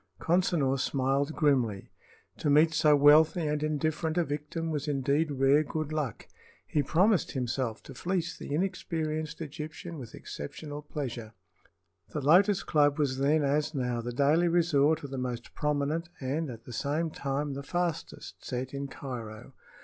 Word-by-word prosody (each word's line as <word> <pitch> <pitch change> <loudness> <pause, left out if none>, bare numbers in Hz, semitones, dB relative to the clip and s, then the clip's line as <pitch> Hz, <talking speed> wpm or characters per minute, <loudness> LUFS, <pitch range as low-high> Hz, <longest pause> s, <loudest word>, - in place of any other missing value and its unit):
Consinor 165 -6 +2
smiled 135 +3 0
grimly. 125 - +1 0.5
To 150 - 0
meet 155 +3 +5
so 155 -1 +5
wealthy 155 +4 +6
and 150 0 -1
indifferent 155 +2 -1
a 175 - +4
victim 150 +2 -4
was 150 -1 -3
indeed 145 +2 +1
rare 140 +2 +3
good 155 0 -4
luck. 145 -8 -3 0.4
He 150 - +1
promised 185 +8 +2
himself 125 -3 -2
to - - -10
fleece 175 -2 -2
the - - -8
inexperienced 155 -2 -2
Egyptian 155 +2 -7
with 120 -3 -9
exceptional 145 - -7
pleasure. 125 -7 -5 0.8
The 150 - -2
Lotus 190 +8 +4
Club 145 -2 +3
was 135 -3 0
then, 145 +3 +3
as 145 +2 0
now, 125 -3 -1
the 120 +1 -4
daily 145 +7 +3
resort 160 -3 +3
of 140 - -7
the 135 - -3
most 125 -2 -4
prominent 150 +3 -1
and 145 +4 -2
at 115 -2 -9
the 120 - -10
same 150 +7 -1
time 140 0 -2
the 140 - -5
fastest 175 +2 -4
set 130 +1 -4
in 140 0 -3
Cairo. 120 -6 -8
150 Hz, 155 wpm, -29 LUFS, 135-160 Hz, 0.8 s, wealthy